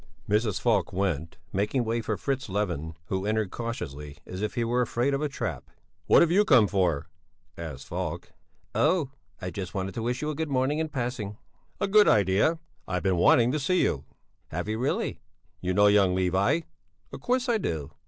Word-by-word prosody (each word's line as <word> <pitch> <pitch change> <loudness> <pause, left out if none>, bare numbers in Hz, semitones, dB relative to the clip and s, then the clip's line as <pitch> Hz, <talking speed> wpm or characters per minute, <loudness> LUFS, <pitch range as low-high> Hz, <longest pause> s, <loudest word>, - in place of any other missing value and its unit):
Mrs. 105 -1 +1
Falk 105 -8 +1
went, 85 -4 -2 0.2
making 105 +6 +1
way 115 +1 0
for 110 -2 -2
Fritz 135 -4 -2
Levin, 90 -6 -2
who 95 0 -1
entered 110 -2 0
cautiously, 75 - -5
as 95 +1 -6
if 105 - -2
he 120 - +1
were 120 +2 +1
afraid 120 +3 0
of 140 - 0
a 150 - 0
trap. 140 - -4 0.4
"What - - +7
have 170 - +1
you 200 +4 +5
come 125 - +6
for?" 90 -8 +1 0.5
asked 75 -6 -7
Falk. - - -4 0.4
"Oh, 155 -3 +2 0.3
I 90 - -3
just 95 0 -6
wanted 95 0 -2
to 115 - -4
wish 125 +4 -2
you 155 - -1
a - - -5
good 160 +1 -2
morning 135 +3 +1
in 160 -1 -1
passing." 120 -7 -3 0.4
"A 200 - +1
good 210 +1 +6
idea! 100 - +3 0.3
I've 90 -1 -2
been 95 -3 +2
wanting 115 +7 +5
to 150 - 0
see 185 +6 +2
you." 70 - -1 0.4
"Have 90 +4 -4
you 110 +1 -2
really?" 130 - -1 0.4
"You 90 - -1
know 100 +3 +4
young 100 -3 +5
Levi?" 95 - +2 0.5
"Of - - -7
course 255 +1 0
I 235 -2 +2
do!" 80 - -3
110 Hz, 195 wpm, -27 LUFS, 95-135 Hz, 0.5 s, What